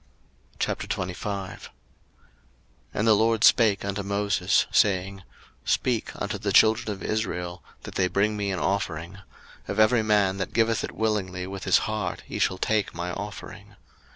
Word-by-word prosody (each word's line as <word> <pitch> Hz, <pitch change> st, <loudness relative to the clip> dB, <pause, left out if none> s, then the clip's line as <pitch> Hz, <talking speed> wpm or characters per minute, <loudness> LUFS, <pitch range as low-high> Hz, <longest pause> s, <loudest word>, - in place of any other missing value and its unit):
02:025:001 95 Hz, +1 st, -3 dB, 1.2 s
And 105 Hz, -, -1 dB
the 110 Hz, -, +7 dB
LORD 110 Hz, +1 st, +2 dB
spake 105 Hz, -5 st, +5 dB
unto 100 Hz, 0 st, -2 dB
Moses, 100 Hz, -2 st, +1 dB
saying, 95 Hz, -1 st, +2 dB, 0.5 s
02:025:002 -, -, -1 dB
Speak -, -, 0 dB
unto -, -, -3 dB
the -, -, -1 dB
children 110 Hz, 0 st, +4 dB
of 100 Hz, -, -7 dB
Israel, 90 Hz, -5 st, -3 dB, 0.2 s
that -, -, -8 dB
they 95 Hz, -, +1 dB
bring 100 Hz, +4 st, +1 dB
me 100 Hz, -1 st, -2 dB
an 95 Hz, -, -1 dB
offering: 95 Hz, -2 st, -2 dB, 0.5 s
of -, -, -3 dB
every 110 Hz, +2 st, +5 dB
man 105 Hz, -3 st, +2 dB
that 95 Hz, -, -4 dB
giveth 115 Hz, 0 st, +2 dB
it -, -, -5 dB
willingly 95 Hz, -5 st, -1 dB
with 95 Hz, 0 st, -7 dB
his 95 Hz, -, +5 dB
heart 110 Hz, -3 st, -3 dB
ye -, -, -5 dB
shall 95 Hz, -, +1 dB
take 105 Hz, -1 st, 0 dB
my 85 Hz, +1 st, -3 dB
offering. 100 Hz, +1 st, -8 dB
100 Hz, 155 wpm, -26 LUFS, 95-110 Hz, 1.2 s, the